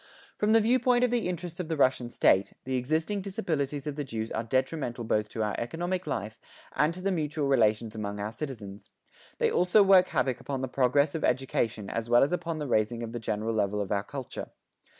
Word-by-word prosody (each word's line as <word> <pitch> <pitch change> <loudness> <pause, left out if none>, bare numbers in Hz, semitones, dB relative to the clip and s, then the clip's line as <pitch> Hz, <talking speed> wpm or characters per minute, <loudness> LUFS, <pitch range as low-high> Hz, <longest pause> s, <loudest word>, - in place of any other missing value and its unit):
From 210 +1 +2
the 225 - +7
viewpoint 245 +2 +3
of 250 - +2
the 235 -7 0
interests 175 -1 -5
of 180 - -3
the 160 -1 -2
Russian 130 -3 +2
state, 95 -4 +3
the 130 - -4
existing 160 +10 -1
disabilities 155 - -2
of 150 -1 -4
the 145 - -1
Jews 115 -4 -4
are 110 - -2
detrimental 130 0 -1
both 105 -1 0
to 110 - -2
our 105 - -1
economic 175 +9 -3
life, 110 +2 -4 0.4
and 150 +2 +3
to 185 - -8
the 195 +1 0
mutual 150 -4 -1
relations 110 -4 +2
among 105 -2 -4
our 105 +1 -3
citizens; 110 -7 -7 0.5
they - - +2
also 180 +4 +5
work 190 -2 +6
havoc 130 -3 0
upon 135 +1 -4
the 130 - -1
progress 140 +3 +2
of 160 - -3
education 115 -5 0
as 115 +2 -3
well 120 +1 +6
as 140 - +1
upon 170 -2 -2
the 150 - -3
raising 115 -1 0
of 115 - -5
the 120 - -4
general 110 0 -2
level 105 -1 0
of 100 -1 -3
our 100 -1 +1
culture. 135 0 -7
135 Hz, 210 wpm, -28 LUFS, 110-165 Hz, 0.5 s, the